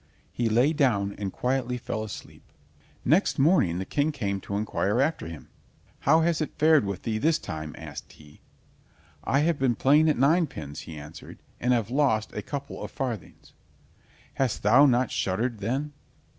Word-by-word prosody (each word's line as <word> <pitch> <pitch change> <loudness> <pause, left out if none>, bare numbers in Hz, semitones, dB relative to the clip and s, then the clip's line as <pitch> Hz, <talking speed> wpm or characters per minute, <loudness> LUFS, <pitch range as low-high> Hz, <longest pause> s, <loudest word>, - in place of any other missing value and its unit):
He 120 -2 -1
lay 125 +8 +3
down 110 -10 +1
and 100 -2 -3
quietly 125 +1 -1
fell 110 -2 -4
asleep. 110 - -9 0.6
Next 175 +7 +3
morning 135 - +3
the 95 - -3
King 145 +7 0
came 100 -8 -3
to 100 - -4
inquire 105 +1 0
after 140 - 0
him. 80 -2 -10 0.5
"How 160 +4 +4
has 165 -1 +1
it 155 - -4
fared 155 -5 +5
with 100 -1 -4
thee 110 -1 -1
this 160 +6 +2
time?" 80 - -6
asked 75 -3 -9
he. 75 -1 -18 0.8
"I 135 - +2
have 160 -1 +1
been 130 -3 +2
playing 150 +6 +4
at 150 - +1
ninepins," 135 - +1
he 80 - -8
answered, 75 +3 -11 0.2
"and 125 - +1
have 115 -2 +1
lost 130 -6 +1
a - - -4
couple 140 -1 -6
of - - -5
farthings." 120 -7 -6 0.8
"Hast 130 -4 -1
thou 125 +8 +6
not 125 -1 +2
shuddered 110 +5 -1
then?" 135 +8 -2
125 Hz, 170 wpm, -26 LUFS, 100-145 Hz, 0.8 s, thou